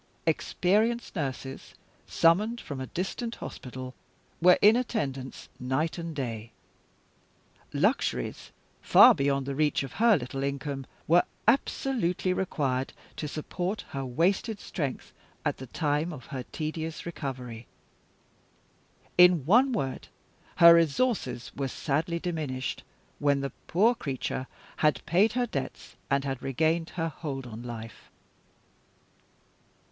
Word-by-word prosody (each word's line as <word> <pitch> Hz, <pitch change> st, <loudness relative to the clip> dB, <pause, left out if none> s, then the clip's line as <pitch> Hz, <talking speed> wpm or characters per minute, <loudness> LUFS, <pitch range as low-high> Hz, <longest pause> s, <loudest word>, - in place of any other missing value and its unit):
Experienced 210 Hz, +9 st, +1 dB
nurses, 135 Hz, -4 st, -5 dB, 0.3 s
summoned 210 Hz, +8 st, +3 dB
from 140 Hz, -, -6 dB
a 130 Hz, -, -4 dB
distant 230 Hz, -, -3 dB
hospital, 130 Hz, 0 st, -7 dB, 0.5 s
were 180 Hz, +1 st, +7 dB
in 210 Hz, +2 st, +7 dB
attendance 140 Hz, -, -3 dB
night 135 Hz, +7 st, -1 dB
and 165 Hz, -2 st, -5 dB
day. 115 Hz, -5 st, -4 dB, 1.2 s
Luxuries, 60 Hz, -1 st, 0 dB, 0.3 s
far -, -, +8 dB
beyond 140 Hz, -1 st, 0 dB
the 140 Hz, -, -3 dB
reach 150 Hz, 0 st, +1 dB
of 135 Hz, -, -6 dB
her 230 Hz, -4 st, +6 dB
little 135 Hz, 0 st, -5 dB
income, 140 Hz, -1 st, -3 dB, 0.2 s
were 175 Hz, +2 st, +6 dB, 0.3 s
absolutely 225 Hz, -7 st, +1 dB
required 135 Hz, -8 st, -1 dB, 0.2 s
to 150 Hz, -, -3 dB
support 175 Hz, +7 st, -4 dB
her 135 Hz, -1 st, -4 dB
wasted 185 Hz, -, 0 dB
strength 145 Hz, -7 st, -4 dB, 0.3 s
at -, -, 0 dB
the 130 Hz, -, -8 dB
time 150 Hz, +4 st, 0 dB
of 140 Hz, -6 st, -9 dB
her 130 Hz, -, -3 dB
tedious 160 Hz, 0 st, -4 dB
recovery. 125 Hz, -8 st, -6 dB, 1.5 s
In 180 Hz, -5 st, +7 dB
one 245 Hz, -, +5 dB
word, 135 Hz, -, -3 dB, 0.5 s
her 170 Hz, 0 st, +9 dB
resources 165 Hz, -, +1 dB
were 140 Hz, -1 st, -1 dB
sadly 155 Hz, +5 st, -1 dB
diminished, 155 Hz, -7 st, -3 dB, 0.4 s
when 140 Hz, -1 st, +2 dB
the 140 Hz, -, -3 dB, 0.2 s
poor 215 Hz, +8 st, +4 dB
creature 135 Hz, -, -4 dB, 0.3 s
had 150 Hz, -4 st, +2 dB
paid 185 Hz, +7 st, +3 dB
her 245 Hz, 0 st, +1 dB
debts, 140 Hz, -, -5 dB
and 140 Hz, 0 st, +2 dB
had 135 Hz, -2 st, -3 dB
regained 160 Hz, +5 st, 0 dB
her 165 Hz, -1 st, 0 dB
hold 135 Hz, -3 st, -5 dB
on 115 Hz, -1 st, -8 dB
life. 115 Hz, -2 st, -8 dB
150 Hz, 120 wpm, -28 LUFS, 135-180 Hz, 1.5 s, her